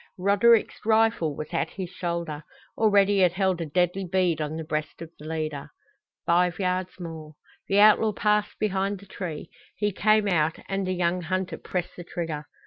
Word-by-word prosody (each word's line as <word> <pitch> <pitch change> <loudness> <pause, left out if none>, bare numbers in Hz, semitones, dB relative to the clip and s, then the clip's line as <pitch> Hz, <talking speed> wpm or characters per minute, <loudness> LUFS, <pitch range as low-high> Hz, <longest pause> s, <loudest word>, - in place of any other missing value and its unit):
Roderick's 205 +5 +3
rifle 220 -8 +2
was 155 - -6
at - - -1
his 185 -3 -6
shoulder. 170 -4 -4 0.3
Already 200 -2 +4
it 180 -2 +4
held 190 -2 0
a 165 - -3
deadly 180 +5 0
bead 180 -3 +1
on 150 +1 -3
the 160 - -4
breast 155 -1 -4
of 165 -1 -9
the 150 - -10
leader. 155 -3 -4 0.6
Five 175 +1 +2
yards 185 -1 -2
more 160 -3 -8 0.3
The 200 +1 +4
outlaw 215 +1 +6
passed 210 +1 0
behind 200 -1 -1
the 200 - -14
tree; 180 -5 -7 0.2
he 210 -1 0
came 215 +2 +3
out, 160 -4 +1
and 195 -1 -2
the 185 - 0
young 180 0 0
hunter 185 +2 -3
pressed 180 -1 -4
the 175 - -7
trigger. 160 -4 -5
180 Hz, 175 wpm, -26 LUFS, 165-200 Hz, 0.6 s, outlaw